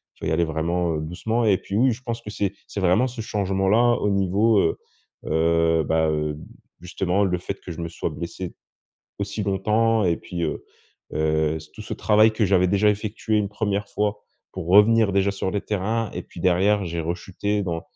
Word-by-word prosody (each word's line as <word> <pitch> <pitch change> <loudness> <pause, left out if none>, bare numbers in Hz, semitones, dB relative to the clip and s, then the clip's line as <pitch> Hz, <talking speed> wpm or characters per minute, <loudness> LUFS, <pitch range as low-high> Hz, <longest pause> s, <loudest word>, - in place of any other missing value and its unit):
tu - - -29
dois - - 0
y - - +1
aller 85 +1 +2
vraiment 85 +2 -1
doucement» 90 +10 -2
et 100 -3 +4
puis, 100 - -6
oui, 130 +3 +4
je 120 +2 -5
pense 115 -1 -4
que 105 - -9
c'est 100 -2 -2
c'est - - -5
vraiment 95 +8 +3
ce 125 -1 -9
changement 95 -2 -1
là, 120 +3 +4
au 105 - +1
niveau, 100 +3 +3
heu, 80 - +1 0.5
heu, 80 0 +2
bah, 80 +1 +1
heu, 75 -1 -1 0.4
justement 90 +2 0
le 90 -2 0
fait 95 +2 -5
que 90 - -8
je 85 - -7
me 85 - -4
sois 80 - -3
blessé 85 +1 -6 0.6
aussi 100 +1 -3
longtemps 105 +3 +1
et 85 -2 +2
puis, 90 - -7
heu, 75 - -4 0.5
heu, 80 0 +1 0.2
tout 110 - -8
ce - - -7
travail 110 +1 +4
que 110 -1 +1
j'avais 90 -1 +3
déjà 100 +3 +3
effectué 110 +1 -2
une 100 -1 0
1re 105 -1 -1 0.7
pour 95 -3 -6
revenir 105 +2 +5
déjà 100 +1 +2
sur 95 -1 -2
les 100 - 0
terrains 110 +2 -1
et - - -4
puis - - -12
derrière, 95 +3 +2
j'ai 85 0 -3
rechuté 95 +5 -2
dans 85 -3 -3
95 Hz, 195 wpm, -23 LUFS, 85-105 Hz, 0.7 s, revenir